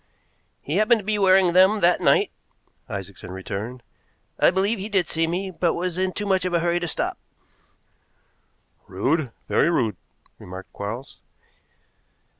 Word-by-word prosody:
"He 150 +6 -2
happened 215 +3 +4
to - - -16
be 210 0 0
wearing 190 -2 +5
them 190 +4 +5
that 175 +1 +3
night," - - +3 0.6
Isaacson 100 -2 -7
returned. 100 +6 -6 0.6
"I - - +6
believe 195 +4 0
he 200 +3 -5
did 190 -5 +1
see 165 0 0
me, 185 +3 -2
but 175 -1 0
was 180 0 -2
in 185 0 +1
too 205 - -4
much 190 -2 +2
of 180 -1 -1
a - - +3
hurry 170 +1 +1
to 175 - -3
stop." - - -3 1.7
"Rude, 130 - 0 0.2
very - - +3
rude," 120 -10 0 0.4
remarked 95 +1 -10
Quarles. 115 +6 -6
175 Hz, 150 wpm, -23 LUFS, 125-190 Hz, 1.7 s, I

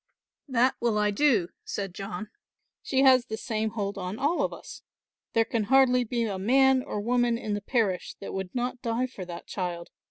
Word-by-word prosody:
"That 255 -1 +3
will 235 -3 +1
I 210 0 +2
do," 205 -6 +3
said 195 -3 -4
John, 210 +3 -6 0.5
"she 265 -1 +1
has 255 -2 +6
the 220 - -4
same 220 -2 -2
hold 200 -2 -3
on 185 +3 -4
all 295 +7 +1
of - - 0
us. - - -10 0.5
There 225 0 +3
can 225 -2 -1
hardly 250 0 +5
be 235 0 -1
a 200 -4 -2
man 265 +5 +4
or 210 - -4
woman 240 +2 +1
in 215 -3 -3
the 205 - -2
parish 205 -5 -1
that 195 - -7
would 190 +1 -5
not 245 0 -2
die 235 +1 0
for 225 -7 -8
that 175 -1 -8
child. 175 -2 -4
225 Hz, 195 wpm, -27 LUFS, 200-250 Hz, 0.5 s, has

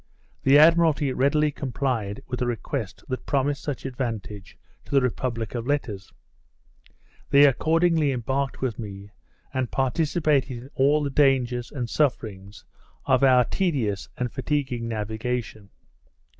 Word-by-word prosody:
The 135 +2 +5
Admiralty 155 -3 +4
readily 150 +3 +2
complied 125 -7 -3
with 125 0 -5
a 125 - +1
request 115 -3 -4
that 130 -1 -5
promised 140 +1 0
such 140 -4 -5
advantage 115 -6 -5 0.3
to - - -20
the - - +7
republic 120 -2 -2
of 120 0 -4
letters. 115 -10 -2 1.2
They 140 +1 +7
accordingly 160 +2 +2
embarked 130 +2 -2
with 125 -5 -2
me, 100 -2 -8 0.4
and 130 -2 -1
participated 140 -1 0
in 125 +3 -11
all 145 +3 +3
the 140 - -2
dangers 125 -4 +2
and 125 -4 -3
sufferings 105 -8 -2 0.4
of 130 -3 +3
our 130 -2 +6
tedious 130 - -1
and 125 -1 -2
fatiguing 130 -4 -2
navigation. 110 -1 -4
130 Hz, 130 wpm, -25 LUFS, 115-145 Hz, 1.2 s, the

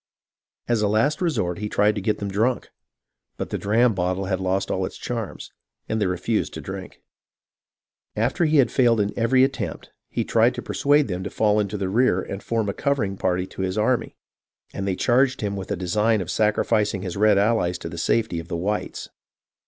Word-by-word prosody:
As 120 -3 +1
a 105 - +2
last 135 - +1
resort, 95 - 0
he 105 0 -3
tried 105 +1 +3
to 105 - -4
get 105 +3 0
them 100 -1 -4
drunk; 115 +6 0 0.7
but - - -5
the - - -1
dram 115 +3 +3
bottle 95 +1 -1
had 95 -1 -1
lost 95 +1 -1
all - - 0
its - - -5
charms, - - -5 0.4
and 110 0 -1
they 100 - +2
refused 90 +5 -1
to - - -5
drink. - - -8 0.6
" - - -71 0.3
After 170 - +1
he 155 0 +3
had 135 -3 +4
failed 120 -4 +3
in 105 0 0
every 125 +3 +3
attempt, 135 +1 -3 0.2
he - - -1
tried - - +3
to - - -5
per - - -5
suade 145 +1 +3
them 95 -3 -4
to - - -4
fall 105 -1 +2
into 105 0 -1
the 95 -1 -2
rear 105 -2 +2
and 100 +1 -5
form 115 -2 -1
a 100 - -1
covering 130 -9 -1
party 90 -1 0
to 95 - -8
his 95 +1 -2
army, 120 +3 0 0.6
and 100 - -3
they 95 - 0
charged 130 +4 +2
him 100 -2 -2
with 95 -1 -6
a 100 - 0
design 105 +5 +1
of 90 - -4
sacrificing 105 -2 +1
his 90 -3 -4
red 105 0 +4
allies 100 -4 +2
to - - -7
the 85 - -6
safety 110 -1 +1
of 85 - -8
the 85 - -3
whites. 105 +5 -3
105 Hz, 210 wpm, -23 LUFS, 95-115 Hz, 0.7 s, had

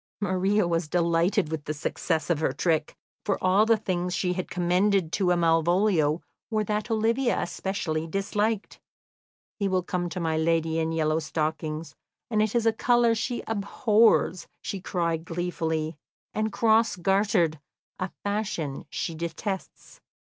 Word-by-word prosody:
Maria 195 0 +1
was 165 -1 0
delighted 170 +1 +1
with 155 -2 -4
the 155 - -3
success 160 +2 -1
of 160 - +1
her 155 - +1
trick, 155 +2 0 0.3
for 200 - 0
all 190 +4 +3
the 225 -1 +5
things 180 -3 -2
she 180 0 0
had 185 0 -4
commended 180 0 +2
to 190 -1 0
Malvolio 170 -1 +2 0.3
were 215 -2 +1
what 210 +2 -2
Olivia 230 +3 +1
especially 165 -5 -2
disliked. 205 +4 -1 0.8
"He 200 - +1
will 185 -1 +1
come 175 0 -2
to 170 - -5
my 160 -2 0
lady 165 0 +1
in 160 0 0
yellow 155 -1 +1
stockings, 155 0 -3 0.4
and 215 -1 +3
it 215 +1 0
is 235 -1 +2
a 225 - +4
colour 240 0 +3
she 235 +2 -2
abhors," 215 -2 +2 0.2
she 195 - -4
cried 170 -3 -1
gleefully; 165 -2 -2 0.4
"and 215 0 -1
cross 220 0 +3
gartered, 185 -4 +2 0.4
a 185 - -2
fashion 200 -9 -3
she 165 - -3
detests. 170 +4 -5
180 Hz, 145 wpm, -26 LUFS, 165-210 Hz, 0.8 s, the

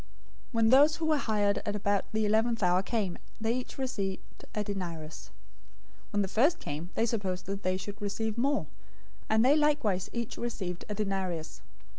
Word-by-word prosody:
020:009 - - -23 0.5
"When 225 -1 +4
those 290 +5 +7
who 325 - -2
were 310 -1 +3
hired 205 -5 +1
at 205 - -2
about 200 -1 +1
the 220 0 +1
eleventh 220 +1 +2
hour 180 +1 +4
came, 195 -3 -2 0.2
they 225 +1 +1
each 250 0 -4
received 205 -8 -4
a 210 - 0
denarius. 170 -6 -5 0.8
020:010 - - -31
When 205 - +3
the - - -2
first 270 - +3
came, 155 - -5
they 225 - +2
supposed 200 -6 -2
that 195 +1 -4
they 185 -1 0
would 205 +1 -7
receive 210 +2 -2
more; 275 +5 +1 0.6
and 220 +2 +4
they 280 +3 +6
likewise 290 -12 +2
each 235 -2 -4
received 190 -7 -4
a 210 - -2
denarius. 190 -6 -2
210 Hz, 180 wpm, -30 LUFS, 190-235 Hz, 0.8 s, those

